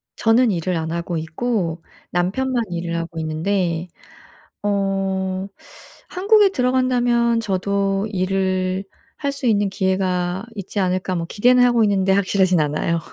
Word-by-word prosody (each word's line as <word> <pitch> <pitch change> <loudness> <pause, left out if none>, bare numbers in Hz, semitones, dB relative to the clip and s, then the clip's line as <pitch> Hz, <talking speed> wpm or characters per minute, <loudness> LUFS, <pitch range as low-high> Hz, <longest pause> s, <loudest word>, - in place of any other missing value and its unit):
저는 225 +1 +3
일을 175 0 -1
안 160 0 -3
하고 170 0 -3
있고 165 0 -2 0.3
남편만 235 +8 0
일을 170 0 -3
하고 165 0 -4
있는데 170 +2 -1 0.8
어 195 -1 -1 0.6
한국에 405 +2 +4
들어간다면 245 -4 +2
저도 195 0 0
'일을 185 0 -1 0.3
할 280 -1 -1
수 275 -2 -4
있는 205 -3 +2
기회가 185 0 -1
있지 200 +1 -4
않을까.' 185 0 0
뭐 165 - -3
기대는 250 +4 +4
하고 240 -2 +4
있는데 195 -2 +1
확실하진 190 -2 +2
않아요. 155 +3 0
195 Hz, 275 characters per minute, -21 LUFS, 180-230 Hz, 0.8 s, 한국에